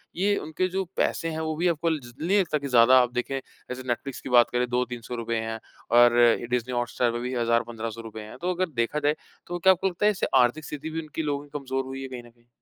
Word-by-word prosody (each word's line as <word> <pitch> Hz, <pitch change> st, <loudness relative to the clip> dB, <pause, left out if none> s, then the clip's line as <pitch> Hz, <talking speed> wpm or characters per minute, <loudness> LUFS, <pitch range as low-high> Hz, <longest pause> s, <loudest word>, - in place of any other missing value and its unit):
ये 200 Hz, +3 st, +2 dB
उनके 160 Hz, +4 st, -2 dB
जो 190 Hz, +1 st, -2 dB
पैसे 165 Hz, -, 0 dB
हैं 160 Hz, -1 st, -4 dB
वो 155 Hz, -1 st, -2 dB
भी 170 Hz, +3 st, +1 dB
आपको 165 Hz, -1 st, +1 dB
ज 120 Hz, -2 st, -13 dB
नहीं 190 Hz, +6 st, +3 dB
लगता 165 Hz, -5 st, +1 dB
कि 140 Hz, -1 st, -5 dB
ज़्यादा 125 Hz, 0 st, +6 dB
आप 125 Hz, -1 st, 0 dB
देखें 130 Hz, +2 st, -2 dB, 0.3 s
जैसे 125 Hz, +1 st, -5 dB
नेटफ्लिक्स 125 Hz, +2 st, -3 dB
की -, -, -7 dB
बात 120 Hz, -1 st, +6 dB
करें 125 Hz, 0 st, +1 dB
2 125 Hz, +1 st, +1 dB
300 120 Hz, 0 st, -7 dB
रुपए 115 Hz, 0 st, -3 dB
हैं 110 Hz, 0 st, -3 dB, 0.4 s
और 120 Hz, 0 st, +6 dB, 0.3 s
डिज़नी 125 Hz, 0 st, -1 dB
हॉटस्टार 120 Hz, 0 st, 0 dB
पे 120 Hz, -, -3 dB
भी 125 Hz, +1 st, -4 dB
1000 115 Hz, 0 st, +2 dB
1500 115 Hz, -1 st, -5 dB
रुपए 110 Hz, -1 st, -8 dB
हैं। 105 Hz, 0 st, -10 dB
तो 180 Hz, +1 st, 0 dB
अगर 185 Hz, 0 st, -1 dB
देखा 115 Hz, +6 st, 0 dB
जाए 150 Hz, 0 st, +1 dB, 0.3 s
तो 175 Hz, 0 st, -4 dB
क्या 190 Hz, +2 st, +6 dB
आपको 185 Hz, +1 st, -1 dB
लगता 185 Hz, +2 st, -1 dB
है 210 Hz, -, +6 dB
इससे 200 Hz, -, -2 dB
आर्थिक 125 Hz, +6 st, +1 dB
स्थिति 150 Hz, +2 st, -6 dB
भी 160 Hz, +1 st, -3 dB
उनकी 155 Hz, +1 st, -5 dB
लोगों 145 Hz, -1 st, -2 dB
की 145 Hz, -, -17 dB
कमजोर 135 Hz, -1 st, -2 dB
हुई 135 Hz, 0 st, -6 dB
है 135 Hz, -, -5 dB
कहीं 125 Hz, -2 st, -8 dB
न 120 Hz, -, -15 dB
कहीं? 120 Hz, 0 st, -29 dB
130 Hz, 260 wpm, -26 LUFS, 120-160 Hz, 0.4 s, ज़्यादा